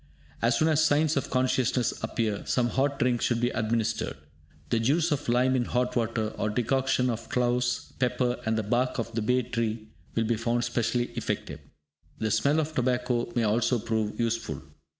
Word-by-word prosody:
As 115 0 +3
soon 155 - +3
as 155 0 +3
signs 155 +1 +3
of 140 - -1
consciousness 130 -1 +1
appear, 110 -2 -1
some 120 -2 +2
hot 140 +2 0
drink 125 -2 +1
should 120 -1 +1
be 120 +1 +1
administered. 110 0 -1 0.5
The 115 - +3
juice 155 +9 +2
of 145 -3 -1
lime 125 +2 +3
in 125 -2 +1
hot 125 +1 0
water, 115 -2 0
or 105 - 0
decoction 130 +3 +1
of 115 -2 -3
cloves, 125 0 0
pepper, 125 -1 +1
and 110 0 0
the 110 - 0
bark 120 +4 0
of 115 -1 -3
the 115 - -1
bay 125 +4 +2
tree, 115 -2 -3 0.3
will 115 - +2
be 115 0 0
found 120 +1 0
specially 120 0 0
effective. - - -3 0.6
The 110 -1 -1
smell 140 +9 +3
of 155 0 -2
tobacco 125 -3 0
may 120 - +2
also 115 +3 +2
prove 110 -1 -2
useful. 115 - -2
120 Hz, 180 wpm, -27 LUFS, 115-130 Hz, 0.6 s, As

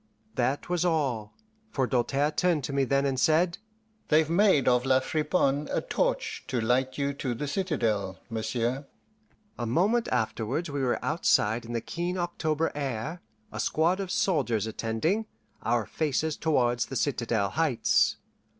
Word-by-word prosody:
That 130 +2 -1
was 175 -1 0
all, 135 -11 0 0.3
for 135 -8 0
Doltaire 135 +4 +1
turned 170 -3 +1
to 140 - -4
me 135 -1 +2
then 140 +2 +1
and 135 -2 0
said, 170 +5 +3 0.5
"They've 155 +1 +3
made 180 -6 +4
of 125 -1 +4
La 130 0 +4
Friponne 150 0 0
a - - +1
torch - - -1
to 125 - -1
light 130 +3 +1
you 140 0 0
to 130 -3 -3
the 145 +5 -4
citadel, 115 - -1
monsieur." 115 +4 -2 0.7
A 120 - -2
moment 205 - +2
afterwards 125 +6 -1
we 140 -1 -2
were 125 -2 0
outside 115 -8 +2
in 120 - -6
the 115 - -1
keen 175 +8 -3
October 165 -3 -1
air, 145 +4 -4 0.3
a 105 - -6
squad 165 - +1
of 195 -2 -3
soldiers 130 - +1
attending, 115 - -1 0.3
our 115 -2 +1
faces 155 +3 -1
towards 120 -7 +1
the 135 - -6
citadel 115 -6 0
heights. 155 -7 +2
140 Hz, 150 wpm, -28 LUFS, 120-160 Hz, 0.7 s, made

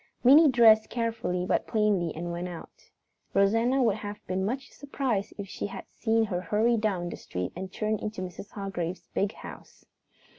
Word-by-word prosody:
Minnie 290 +5 +8
dressed 225 -3 +6
carefully 225 -6 -2
but - - 0
plainly 205 -6 +1
and 170 +2 -4
went 175 +1 -4
out. 175 -2 -11 0.5
Rosanna 225 +7 +3
would 220 -3 +2
have 205 -1 -6
been 185 +1 -1
much 260 +7 -3
surprised 265 -7 -2
if 200 -1 -6
she 190 - -4
had - - -8
seen 225 -1 +1
her 180 -5 -2
hurry 215 +6 +2
down 200 -6 -1
the - - -5
street 90 0 -5
and 185 +1 -6
turn 215 +1 -1
into 210 -2 -5
Mrs. 185 +3 -8
Hargrave's 190 -3 -5
big 200 +1 0
house. - - -12
210 Hz, 175 wpm, -28 LUFS, 185-225 Hz, 0.5 s, Minnie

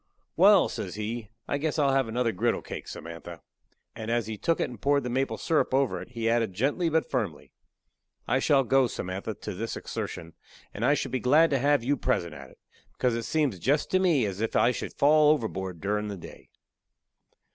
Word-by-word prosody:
"Wal," - - +6
says - - -5
he, 110 +1 -4 0.2
"I 145 - -1
guess 155 +1 -1
I'll 140 -3 +3
have 135 -3 +2
another 115 +1 0
griddle 90 - 0
cake, - - -7
Samantha." 85 -1 -8 0.6
And 110 0 -6
as 120 -1 +1
he 110 0 -5
took 165 +10 0
it - - +1
and 120 -5 -11
poured 140 0 +2
the 125 - -3
maple 135 +2 -1
syrup 155 -4 +1
over 135 -2 +1
it, 125 - -12
he 115 -1 -2
added 115 -4 +1
gently 145 - +1
but 160 0 +1
firmly: 105 - -3 0.8
"I 130 +3 +2
shall 135 0 +3
go, 130 +2 +3
Samantha, 95 -3 -5
to - - -6
this - - -4
exertion, 85 -1 -6 0.4
and - - -5
I - - +4
should - - -3
be 130 - -1
glad 150 +7 +4
to 140 - +2
have 145 -1 +2
you 140 +3 +1
present 85 -8 -1
at 70 -3 -10
it, - - -20 0.4
because 125 -2 0
it 115 -1 -3
seems 140 - 0
jest 145 - +1
to 185 - +3
me 165 -10 +3
as 100 0 -4
if 115 - -2
I 120 - +4
should - - -5
fall 150 +1 +5
overboard 95 - -2
durin' 105 +2 -1
the 100 -1 -5
day." 85 - -12
120 Hz, 210 wpm, -27 LUFS, 105-140 Hz, 0.8 s, Wal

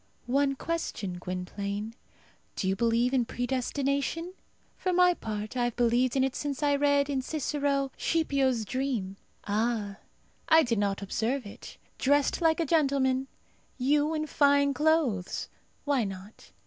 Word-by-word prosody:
One 275 +2 +1
question, 240 - -3
Gwynplaine: 200 +4 -4 0.6
do 190 - -2
you 190 - +1
believe 235 +4 +1
in 255 -2 +3
predestination? 275 +7 -2 0.4
For 370 - -1
my 360 0 +5
part, 215 -5 -5
I 245 -1 +1
have 240 - -2
believed 245 +1 +2
in 265 - +3
it 270 0 -1
since 290 0 -3
I 285 -1 +3
read, 285 0 +3
in 275 -2 -1
Cicero, 280 -1 -1
Scipio's 275 -8 +1
dream. 225 -5 -2 0.3
Ah! 210 -1 -1 0.5
I 320 0 +7
did 230 -5 0
not 200 -1 -1
observe 230 +6 -1
it. 200 - -11 0.2
Dressed 285 +4 +2
like 325 -1 +3
a 335 - +1
gentleman! 270 -4 +2 0.5
You 295 +4 +2
in 310 0 -1
fine 285 -1 +3
clothes! 295 - 0 0.4
Why 280 -4 +2
not? 195 +1 -9
265 Hz, 140 wpm, -28 LUFS, 225-285 Hz, 0.6 s, I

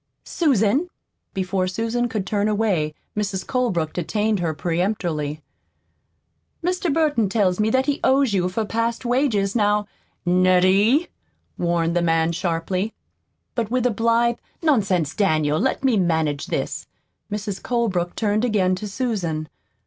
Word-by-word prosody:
"Susan!" 275 - +2 0.5
Before 185 0 0
Susan 230 +5 -1
could 215 -4 -2
turn 205 0 0
away, 200 -8 0 0.2
Mrs. 205 -2 -2
Colebrook 190 -12 0
detained 210 +4 0
her 170 -2 0
peremptorily." 165 -3 -2 1.2
Mr. 360 -2 0
Burton 290 -9 +2
tells 195 -3 +1
me 215 +1 +2
that 260 +3 +2
he 290 -1 0
owes 265 -3 +3
you 180 -2 +1
for 215 +4 -2
past 230 +3 -2
wages. 240 -6 +1
Now 210 -1 +2 0.3
" - - -46
"NETTIE!" 185 - +4 0.5
warned 170 -1 +1
the 175 - +2
man 165 -1 +2
sharply. 180 +4 -2 0.6
But 230 -4 -2
with 250 0 0
a 250 - +3
blithe 230 +2 +2 0.3
"Nonsense, 195 - +2
Daniel, 155 -6 +1
let 265 +5 0
me 255 -5 +3
manage 160 -5 0
this!" - - -3 0.4
Mrs. 205 -1 -4
Colebrook 205 -8 -1
turned 215 0 0
again 200 -6 +2
to 210 - -5
Susan. 190 -9 -2
205 Hz, 135 wpm, -22 LUFS, 175-235 Hz, 1.2 s, NETTIE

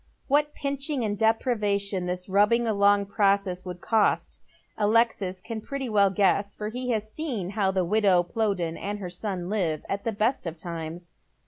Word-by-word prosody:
What 295 +1 +2
pinching 280 -1 -2
and 205 -2 -1
deprivation 205 -4 +1
this 180 0 -3
rubbing 210 +5 +3
along 200 -2 +3
process 195 -2 +1
will 180 -1 -6
cost, 215 +4 +1 0.4
Alexis 210 -4 +1
can 225 +2 -6
pi'etty 270 0 -4
well 200 -2 +4
guess, 200 +1 +1
for 210 0 -4
he 250 +2 -4
has 215 -2 -1
seen 240 - -2
how 200 -2 +1
the 190 -1 0
wido^* 190 -3 +3
Plowden 195 -7 -1
and 205 +1 -4
her 185 -3 -6
son 180 -1 -4
live 180 -7 -1
at 200 0 -3
tlae 225 -3 -3
best 225 -2 0
of 165 0 -5
times. 170 0 -6
205 Hz, 165 wpm, -26 LUFS, 185-225 Hz, 0.4 s, well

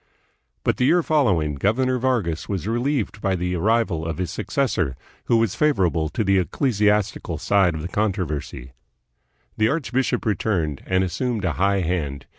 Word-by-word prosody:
But - - +1
the 125 - +2
year 175 +5 +4
following, 100 - +2
Governor 125 - +1
Vargas 110 -11 -1
was 95 -1 -3
relieved 120 -2 -1
by 95 -1 +1
the 90 0 -2
arrival 100 -3 +1
of 80 0 -3
his 90 -2 -3
successor, 90 - -1 0.3
who 115 - +3
was 115 -4 +1
favorable 90 - +1
to 95 - -1
the 95 -1 +3
ecclesiastical 105 - 0
side 90 0 +2
of 75 - -5
the - - -3
controversy. 85 - -3 0.9
The 110 +1 +3
archbishop 130 -5 -1
returned 90 -9 -1
and 95 0 +2
assumed 110 +2 -2
a 90 - +1
high 100 +3 +1
hand. 75 -6 -2
100 Hz, 155 wpm, -23 LUFS, 85-120 Hz, 0.9 s, year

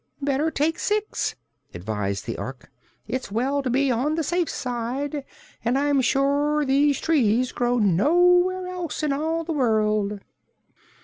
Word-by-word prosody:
"Better 285 +2 0
take 320 +1 0
six," 425 0 -1 0.4
advised 100 +1 -3
the 115 - -4
Ork. 130 -1 -8 0.4
"It's 255 -5 -4
well 265 +6 0
to 265 - -2
be 265 +2 +2
on 265 +6 0
the 325 - -1
safe 345 +2 0
side, 260 +4 -3 0.4
and 240 +3 +1
I'm 285 -1 +2
sure 285 +3 +1
these 280 +1 +3
trees 255 -6 +2
grow 245 0 0
nowhere 355 - +3
else 360 -4 -5
in 295 -2 +1
all 320 +3 -1
the 330 0 -3
world." 215 -6 +1
275 Hz, 140 wpm, -24 LUFS, 235-310 Hz, 0.4 s, these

